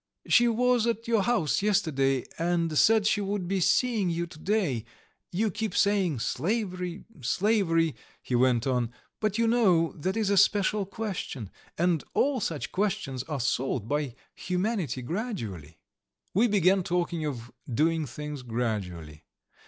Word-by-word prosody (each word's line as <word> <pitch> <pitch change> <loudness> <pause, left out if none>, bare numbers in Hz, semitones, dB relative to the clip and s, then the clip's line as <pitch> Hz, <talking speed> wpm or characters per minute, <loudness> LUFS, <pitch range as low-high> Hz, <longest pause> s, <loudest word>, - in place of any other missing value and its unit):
"She 240 - +5
was 240 0 +2
at 230 0 -2
our 230 -3 +3
house 195 - +1
yesterday, 150 - +1
and 170 -1 0
said 220 +6 +5
she 205 0 +2
would 200 -2 -2
be 195 +1 0
seeing 220 +1 +2
you 170 0 -1
to 160 -2 -13
day. 180 - 0 0.5
You 210 +4 0
keep 220 +2 -3
saying 195 - +2
slavery, 180 - -2
slavery.. 165 - +2 0.2
." - - -31
he - - -5
went 120 -1 +3
on. 125 -3 0 0.3
"But 215 -1 0
you 230 - +2
know 190 -9 +3
that 185 +6 -3
is 210 -3 +1
a 200 - +3
special 200 +1 +3
question, 190 - -5 0.3
and 170 -2 +1
all 275 -2 +2
such 165 -8 -3
questions 190 -10 -1
are 150 -3 -2
solved 120 -2 -1
by 145 -2 -1 0.2
humanity 180 - -2
gradually." 115 - -5 0.6
We 220 +6 +4
began 195 -2 +3
talking 175 -2 -1
of 120 -6 -5 0.2
doing 155 +4 +1
things 150 +2 -6
gradually. 100 -11 -4
175 Hz, 145 wpm, -28 LUFS, 135-210 Hz, 0.6 s, She